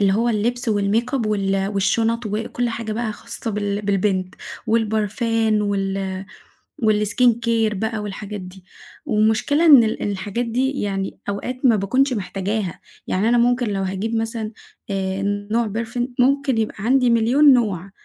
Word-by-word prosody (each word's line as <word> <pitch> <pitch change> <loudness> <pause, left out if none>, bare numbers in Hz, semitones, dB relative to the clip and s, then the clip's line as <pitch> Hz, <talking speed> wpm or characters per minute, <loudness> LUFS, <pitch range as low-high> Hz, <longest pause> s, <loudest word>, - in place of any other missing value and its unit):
اللي 195 -1 +3
هو 230 +4 +1
اللبس 235 +2 0
والmakeup 220 +4 0
وال 195 -2 0
والشُنَط 225 +3 +1
وكُلّ 225 +3 -2
حاجة 225 -1 -4
بقى 220 -1 -2
خاصة 225 - -6
بال 205 0 -2
بالبنت، 195 -1 0 0.3
والبرفان 220 0 +1
وال 195 -1 -2 0.6
والskincare 225 +1 +2
بقى 220 +2 -2
والحاجات 205 0 -6
دي. 185 0 -11 0.4
والمشكلة 220 +9 +2
إن 280 -7 +9
ال 220 - -2
الحاجات 205 +4 -2
دي 265 +4 -1
يعني 195 -1 -3
أوقات 250 +6 -4
ما 235 - +6
باكونش 255 +7 +1
محتاجاها، 195 -2 -3 0.3
يعني 205 +5 +1
أنا 240 - +4
ممكن 245 0 +2
لو 195 -2 -1
هاجيب 195 +4 -2
مثلًا 225 -1 -2 0.4
آآ، 195 0 -2 0.5
نوع - - -1
perfume 240 +2 -3
ممكن 270 -1 +2
يبقى 215 -3 -2
عندي 250 +1 +3
مليون 250 +6 +5
نوع، 200 -6 0
220 Hz, 140 wpm, -21 LUFS, 200-235 Hz, 0.6 s, إن